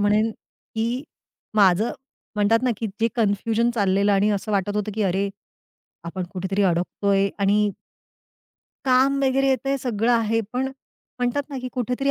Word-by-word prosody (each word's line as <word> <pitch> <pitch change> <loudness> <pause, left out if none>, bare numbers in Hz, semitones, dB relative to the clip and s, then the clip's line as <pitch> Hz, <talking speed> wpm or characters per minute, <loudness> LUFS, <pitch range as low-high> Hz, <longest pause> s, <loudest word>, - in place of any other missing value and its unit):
म्हणेन, 210 +2 +3
की 230 +4 -5 0.5
माझं 200 +2 +4 0.4
म्हणतात 215 +3 +3
ना 255 - +2
की 225 - -3
जे 230 - +3
कन्फ्युजन 225 +2 +1
चाललेलं 200 -1 +2
आणि 200 +2 +3
असं 205 +1 -2
वाटत 200 +1 0
होतं 210 0 -2
की 220 - 0
अरे, 195 +1 +1 0.8
आपण 180 +2 -4
कुठेतरी 190 +2 -1
अडकतोय 195 +2 +1
आणि 205 +1 +3 1.1
काम 265 +2 +4
वगैरे 270 +1 +2
येतंय 270 +1 +1
सगळं 235 -1 +1
आहे 225 -1 +2
पण 260 +2 0 0.5
म्हणतात 250 +3 0
ना, 275 - -4
की 255 0 -5
कुठेतरी 250 +3 -1
215 Hz, 145 wpm, -23 LUFS, 200-245 Hz, 1.1 s, माझं